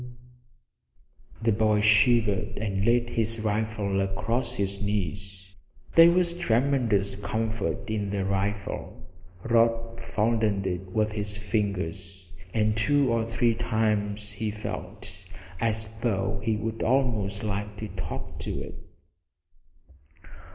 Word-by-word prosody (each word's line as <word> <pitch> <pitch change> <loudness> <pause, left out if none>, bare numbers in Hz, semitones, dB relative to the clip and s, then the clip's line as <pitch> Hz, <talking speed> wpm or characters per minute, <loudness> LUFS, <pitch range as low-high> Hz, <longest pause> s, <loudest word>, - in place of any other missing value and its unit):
The 115 - +4
boy 105 0 +3
shivered 110 -1 +3
and 100 -2 -1
laid 120 +1 +2
his 115 0 0
rifle 105 -2 0
across 115 +6 -1
his 100 0 -2
knees. 95 -1 -3 0.4
There 165 0 +9
was 170 0 +2
tremendous 120 - +1
comfort 110 +1 -2
in 105 -2 -2
the 100 -1 -1
rifle. 100 +1 -2 0.4
Rod 115 0 +2
fondled 110 -3 +1
it 90 0 -3
with 105 +1 +1
his 105 0 -3
fingers, 95 -3 -3 0.2
and 105 0 +1
two 135 +2 +3
or 115 -1 +1
three 115 +1 +2
times 110 -2 0
he 110 +1 -3
felt 100 -2 -5 0.4
as 110 -1 0
though 100 -3 0
he 110 -1 +1
would 110 +1 -4
almost 110 -5 +1
like 105 0 -3
to 110 +2 -5
talk 90 -1 -6
to - - -3
it. - - -8
105 Hz, 115 wpm, -27 LUFS, 100-115 Hz, 0.4 s, There